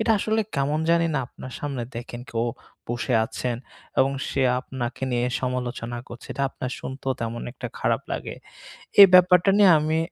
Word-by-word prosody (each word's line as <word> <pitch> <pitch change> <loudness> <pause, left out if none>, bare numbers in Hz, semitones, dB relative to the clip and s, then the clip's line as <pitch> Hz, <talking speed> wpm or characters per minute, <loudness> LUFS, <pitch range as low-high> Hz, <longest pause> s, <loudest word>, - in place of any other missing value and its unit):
এটা 220 - +1
আসলে 220 +2 +1
কেমন 145 +2 0
জানি 170 0 +3
না - - +2
আপনার 130 +1 -10
সামনে 140 -4 -3
দেখেন 120 0 -7
কেউ 115 +1 0 0.4
বসে 120 +1 -1
আছেন 120 +1 -3 0.4
এবং 135 +1 +4 0.2
সে 135 - 0 0.2
আপনাকে 125 -1 -6
নিয়ে 120 0 +1
সমালোচনা 125 -2 -3
করছে। 120 0 -10
এটা 140 - -3
আপনার 130 - -5
শুনতেও 130 0 -3
তেমন 115 0 -3
একটা - - -6
খারাপ - - +1
লাগে। - - -4 0.7
এই 200 - +13
ব্যাপারটা 180 +1 +6
নিয়ে 200 -3 +7
আমি 155 +1 0
130 Hz, 165 wpm, -24 LUFS, 120-155 Hz, 0.7 s, এই